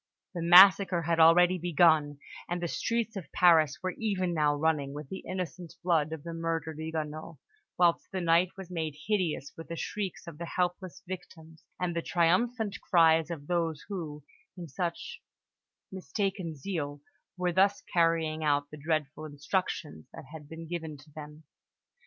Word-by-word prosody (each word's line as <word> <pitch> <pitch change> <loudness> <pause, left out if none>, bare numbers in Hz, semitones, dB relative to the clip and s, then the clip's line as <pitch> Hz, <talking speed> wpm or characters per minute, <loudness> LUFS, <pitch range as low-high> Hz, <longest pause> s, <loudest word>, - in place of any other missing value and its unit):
The 175 - -4
massacre 180 0 +7
had 165 0 0
already 175 +3 +6
begun, 160 -3 +3 0.3
and 175 +1 -2
the 175 - -2
streets 230 +5 -2
of 175 -8 -7
Paris 160 -4 +4
were 185 -1 -2
even 185 -5 -1
now 150 -2 +2
running 145 -2 0
with 150 -2 -8
the 190 - -6
innocent 180 -2 -5
blood 160 -4 +2
of 160 -3 -6
the 170 - -6
murdered 165 -2 -3
Huguenots, 155 0 -5 0.4
whilst 175 -1 +2
the 190 - -2
night 170 +1 +3
was 190 -2 -9
made 160 -4 -3
hideous 180 -9 -1
with 165 - -10
the 170 - -5
shrieks 195 +2 -4
of 165 -3 -10
the 170 - -5
helpless 180 +2 -3
victims 160 -3 -10 0.2
and 180 -2 -2
the 170 - 0
triumphant 200 +7 +1
cries 165 -2 +4
of 160 -4 -6
those 165 -2 -2
who, 155 -7 -6 0.3
in 175 -2 -7
such 170 +4 -5 0.7
mistaken 190 -3 -3
zeal, 145 -3 -4 0.4
were 180 -1 0
thus 195 +3 +3
carrying 165 -2 +1
out 145 -1 +1
the 150 - -9
dreadful 155 0 -2
instructions 145 - -3
that - - -10
had 150 -2 -10
been 165 0 -9
given 160 -3 -5
to 150 +2 -18
them. 150 +1 -10
165 Hz, 160 wpm, -29 LUFS, 155-180 Hz, 0.7 s, massacre